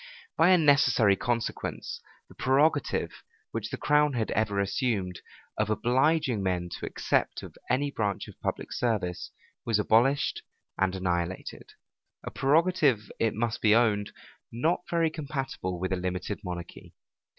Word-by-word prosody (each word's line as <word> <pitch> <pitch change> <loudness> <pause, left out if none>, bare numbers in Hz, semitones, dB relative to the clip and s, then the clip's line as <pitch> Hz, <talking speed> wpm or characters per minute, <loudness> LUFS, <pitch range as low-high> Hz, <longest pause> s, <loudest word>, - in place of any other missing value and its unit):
By 170 - +5
a 185 - +7
necessary 140 - +4
consequence, 120 +3 -3 0.3
the - - -16
prerogative, 145 +3 +1 0.4
which - - -4
the - - -4
crown 150 0 +3
had 115 -3 -1
ever 105 -2 0
assumed, 100 -3 -1 0.4
of 110 -1 +1
obliging 130 +2 +2
men 90 -2 -1
to - - -5
accept - - -1
of - - -10
any 140 +3 +1
branch 105 -6 -2
of - - -13
public - - -3
service, 105 -8 -1 0.3
was 115 -3 +1
abolished 120 +7 +2 0.3
and 95 -1 0
annihilated; 90 -1 -3 0.5
a - - -6
prerogative, 145 - +2
it 115 -2 +1
must 115 +1 -2
be 105 0 +5
owned, 105 -3 +2 0.4
not 155 +10 0
very 165 -2 +1
compatible 135 - -4
with 95 +1 -1
a - - 0
limited 90 +2 -3
monarchy. 90 -2 -8
115 Hz, 140 wpm, -28 LUFS, 95-140 Hz, 0.5 s, a